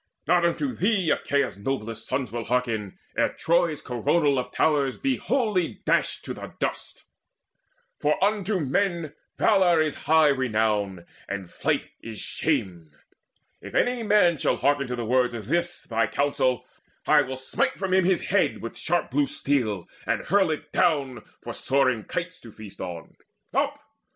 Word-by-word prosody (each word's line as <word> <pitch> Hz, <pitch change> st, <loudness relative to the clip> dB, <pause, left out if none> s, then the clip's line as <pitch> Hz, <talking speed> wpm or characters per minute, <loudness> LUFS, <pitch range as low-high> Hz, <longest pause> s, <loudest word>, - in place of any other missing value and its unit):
Not 175 Hz, +3 st, +3 dB
unto 255 Hz, -, 0 dB
thee 195 Hz, -6 st, +1 dB
Achaea's 140 Hz, -7 st, 0 dB
noblest 115 Hz, -1 st, -4 dB
sons 130 Hz, -4 st, -2 dB
Will 115 Hz, -1 st, -4 dB
hearken, 115 Hz, -6 st, -1 dB, 0.2 s
ere -, -, +1 dB
Troy's 170 Hz, -3 st, +1 dB
coronal 140 Hz, +3 st, +1 dB
of 125 Hz, -, -5 dB
towers 145 Hz, -4 st, +1 dB
Be 270 Hz, -1 st, 0 dB
wholly 215 Hz, -10 st, 0 dB
dashed -, -, +1 dB
to -, -, -4 dB
the -, -, -9 dB
dust: -, -, -4 dB, 1.0 s
for 150 Hz, +1 st, +2 dB
unto 205 Hz, -1 st, +1 dB
men 165 Hz, +1 st, 0 dB, 0.2 s
Valour 185 Hz, -6 st, +4 dB
is 155 Hz, -2 st, 0 dB
high 160 Hz, -1 st, +6 dB
renown, 105 Hz, -8 st, 0 dB, 0.2 s
and 95 Hz, -2 st, -5 dB
flight -, -, -1 dB
is 115 Hz, -2 st, -8 dB
shame! 90 Hz, -, -2 dB, 0.7 s
If -, -, -9 dB
any 245 Hz, -1 st, +2 dB
man 205 Hz, -7 st, +4 dB
shall -, -, +1 dB
hearken 140 Hz, -1 st, +1 dB
to 125 Hz, -, -3 dB
the 120 Hz, -1 st, -4 dB
words 125 Hz, +1 st, +2 dB
Of 110 Hz, -3 st, -6 dB
this 170 Hz, +6 st, -1 dB
thy 115 Hz, -1 st, 0 dB
counsel, 130 Hz, -2 st, 0 dB, 0.4 s
I 150 Hz, -1 st, +6 dB
will 130 Hz, -1 st, -4 dB
smite 265 Hz, -, -1 dB
from 190 Hz, -5 st, -3 dB
him 190 Hz, 0 st, +5 dB
His 185 Hz, 0 st, +2 dB
head 200 Hz, +1 st, +1 dB
with 115 Hz, -, -7 dB
sharp 175 Hz, -4 st, -1 dB
blue 140 Hz, +2 st, +2 dB
steel, 110 Hz, -10 st, -1 dB, 0.2 s
and -, -, 0 dB
hurl 200 Hz, -3 st, +3 dB
it 155 Hz, -, -4 dB
down 135 Hz, -7 st, +1 dB, 0.2 s
For -, -, -5 dB
soaring 130 Hz, -5 st, +1 dB
kites 180 Hz, 0 st, -4 dB
to 115 Hz, -, -13 dB
feast 105 Hz, -2 st, -11 dB
on. 85 Hz, -3 st, -7 dB, 0.4 s
Up! -, -, +1 dB
140 Hz, 160 wpm, -25 LUFS, 120-175 Hz, 1.0 s, high